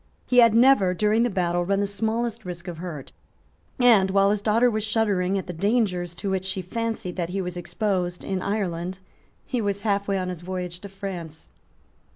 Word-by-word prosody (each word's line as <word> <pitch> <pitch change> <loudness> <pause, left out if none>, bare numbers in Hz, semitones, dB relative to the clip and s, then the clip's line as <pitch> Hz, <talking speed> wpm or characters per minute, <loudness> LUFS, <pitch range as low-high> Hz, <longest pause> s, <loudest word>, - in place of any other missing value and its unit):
He 250 - +4
had 230 -2 +6
never, 230 -7 +5
during 215 +3 +2
the 245 - +2
battle, 175 -3 0
run 195 +2 +1
the 205 - +1
smallest 225 +3 -2
risk 175 -1 -7
of 170 -2 -6
hurt; 165 -6 -7 0.7
and, 225 -7 +5
while 195 +1 +4
his 210 -1 0
daughter 225 +3 +3
was 215 -3 0
shuddering 205 -4 +1
at 190 - -3
the 180 - -6
dangers 180 -2 0
to 195 +2 -3
which 190 -1 -1
she 190 0 -3
fancied 225 -2 -3
that 170 -2 -2
he 195 +2 -2
was 180 -1 -3
exposed 180 0 -2
in 190 -1 -2
Ireland, 185 -3 -2 0.5
he 250 -3 -2
was 200 -1 -1
half 200 -2 0
way 200 -1 +1
on 185 -1 -2
his 180 -2 -6
voyage 180 -1 -5
to 200 - -9
France. 180 -5 -7
195 Hz, 195 wpm, -25 LUFS, 180-215 Hz, 0.7 s, had